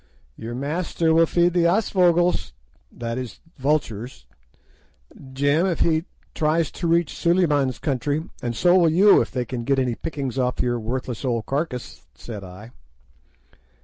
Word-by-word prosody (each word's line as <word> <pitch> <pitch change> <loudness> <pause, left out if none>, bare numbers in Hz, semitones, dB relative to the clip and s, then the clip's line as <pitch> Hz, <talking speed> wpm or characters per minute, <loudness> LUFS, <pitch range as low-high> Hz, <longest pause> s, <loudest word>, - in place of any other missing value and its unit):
"'Your 115 +1 -7
master 160 +4 -1
will 165 0 +5
feed 175 +1 +2
the 175 -1 +2
aasvögels'—that 170 - 0
is, 125 -2 -7 0.2
vultures—'Jim, 130 - -3
if 175 - -2
he 160 0 +2 0.3
tries 160 +1 +1
to 170 - -4
reach 170 -1 +2
Suliman's 150 -7 +2
country, 145 +2 -1 0.2
and 120 -1 -3
so 180 +5 +4
will 170 -2 +4
you 195 +6 +6
if - - -3
they 125 -2 -3
can 120 0 -5
get 135 +3 +1
any 130 -2 +1
pickings 135 -1 -4
off 125 -1 -1
your 120 -1 0
worthless 120 +1 -4
old 120 -4 -1
carcass,' 135 -3 -4
said 105 -4 -8
I. 95 +5 -11
140 Hz, 140 wpm, -23 LUFS, 120-170 Hz, 0.3 s, you